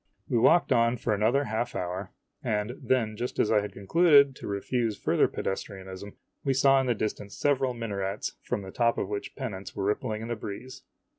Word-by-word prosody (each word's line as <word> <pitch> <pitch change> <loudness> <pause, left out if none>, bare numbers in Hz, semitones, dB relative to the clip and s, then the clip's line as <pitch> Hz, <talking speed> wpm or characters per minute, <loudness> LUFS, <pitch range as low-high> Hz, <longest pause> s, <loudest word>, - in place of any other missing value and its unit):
We 120 - +2
walked 170 +9 +4
on 115 +1 +3
for 110 -1 0
another 115 +7 +2
half 110 -1 -2
hour, 90 +2 -3 0.3
IMAGINOTIONS 105 +2 -1
and - - -13
then 115 -5 +2
just 120 +2 -4
as - - +2
I 105 -2 +4
had 105 - -5
concluded 140 - +5
to - - -8
refuse 110 +2 -1
further - - +2
pedestrianism, 95 0 -5 0.3
we 135 -1 +1
saw 135 0 +5
in 130 - -2
the 120 - +2
distance 105 -1 -4
several 135 -3 +1
minarets 100 -4 -3
from 100 - -3
the 95 - -8
top 115 +2 +2
of 95 - -2
which 105 -1 -5
pennants 105 -8 -6
were 100 - -2
rippling 105 +2 -1
in - - -5
the 120 - -1
breeze. 125 +6 -8
110 Hz, 200 wpm, -28 LUFS, 100-130 Hz, 0.3 s, concluded